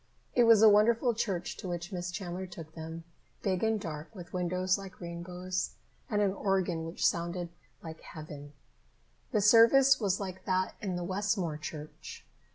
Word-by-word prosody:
It 245 - +5
was 225 -2 +7
a - - +10
wonderful 230 +3 +5
church 195 -6 -2
to - - -6
which 175 +1 -4
Miss 180 -1 -3
Chandler 180 0 -5
took 165 -3 -10
them, 160 +1 -7 0.4
big 190 -1 0
and 220 -1 +2
dark, 155 -5 -6
with 175 -3 -10
windows 185 +1 +1
like 195 -1 -9
rainbows, 180 +1 -4 0.3
and 210 -1 +2
an 195 -2 +2
organ 185 -5 0
which 165 - -2
sounded 170 +1 0 0.3
like 160 -1 -8
heaven. 150 -3 -9 0.8
The 210 - +2
service 235 +6 +7
was 200 -4 +1
like 185 -2 -6
that 185 0 0
in 190 -3 -2
the 175 - -3
Westmore 185 -3 -1
church. 155 -1 -8
185 Hz, 165 wpm, -31 LUFS, 170-205 Hz, 0.8 s, a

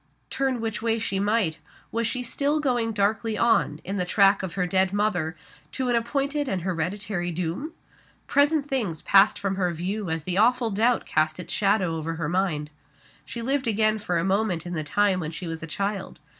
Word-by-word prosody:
Turn 265 -3 0
which 220 -2 -3
way 225 0 +1
she 200 -4 -1
might 205 -6 +1 0.3
was 230 0 0
she 250 0 -2
still 285 +5 0
going 245 -6 0
darkly 215 +1 0
on, 220 -10 +2
in 195 +2 -4
the 180 - +1
track 195 +2 +4
of 190 -3 -5
her 185 -2 +1
dead 190 +1 +2
mother, 185 -6 0 0.4
to 260 -2 -1
an 240 - +2
appointed 280 +5 -1
and 185 -3 -2
hereditary 180 +1 -2
doom? 180 - -3 0.5
Present 290 +1 +2
things 220 - -2
passed 200 +1 +5
from 195 -1 -2
her 180 -2 +1
view 185 +4 -3
as 160 -1 -2
the 185 +3 -1
awful 240 +1 +3
doubt 230 +5 +2
cast 155 +2 0
its 180 - -4
shadow 195 -5 +2
over 165 +1 -3
her 160 -2 -3
mind. 165 -5 -1 0.5
She 235 - -6
lived 270 +1 0
again 215 0 +2
for 180 -4 -1
a 165 - 0
moment 190 -3 0
in 175 - -5
the 155 -2 -2
time 195 +5 +2
when 155 -3 -3
she 165 +3 -6
was 165 -1 -5
a 165 - -6
child. 195 +2 -3
200 Hz, 200 wpm, -25 LUFS, 175-230 Hz, 0.5 s, passed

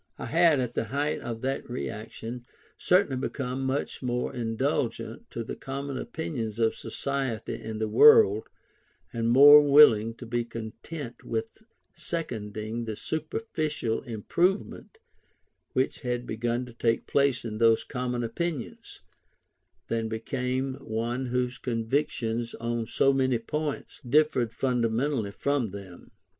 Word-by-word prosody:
I - - -6
had, 165 -2 +4
at 125 -2 -2
the 115 - -1
height 145 +6 -1
of 115 -1 -5
that 135 0 -3
reaction, 120 0 -6 0.3
certainly 180 -7 +2
become 130 0 -3
much 135 +2 -2
more 125 -1 -2
indulgent 115 -2 -2
to 115 - -4
the - - -6
common 140 +1 -5
opinions 125 - -4
of 115 -1 +2
society 135 -5 -3
and 110 -1 -6
the 110 - 0
world, 110 - +6 0.6
and 115 0 0
more 145 +4 +10
willing 140 -7 +6
to 125 - -10
be 120 +1 -1
content 115 +4 -8
with 225 0 -4 0.3
seconding 110 -7 -4
the 110 -1 -4
superficial 155 - -2
improvement 170 - -1 0.8
which 130 +1 0
had 125 -2 -3
begun 120 +2 -2
to 120 - -12
take 115 -1 0
place 140 -3 +1
in 110 -1 -4
those 115 -1 +4
common 125 -2 -3
opinions, 140 +4 -4 0.9
than 115 -1 -1
became 125 +4 -2
one 120 +4 -3
whose 125 0 -1
convictions 115 -1 -1
on 115 -1 -3
so 135 +4 +3
many 130 -2 +2
points, 150 +6 -4
differed 130 -3 +2
fundamentally 125 -1 0
from 135 +2 -1
them. 95 -2 -10
125 Hz, 125 wpm, -27 LUFS, 115-140 Hz, 0.9 s, more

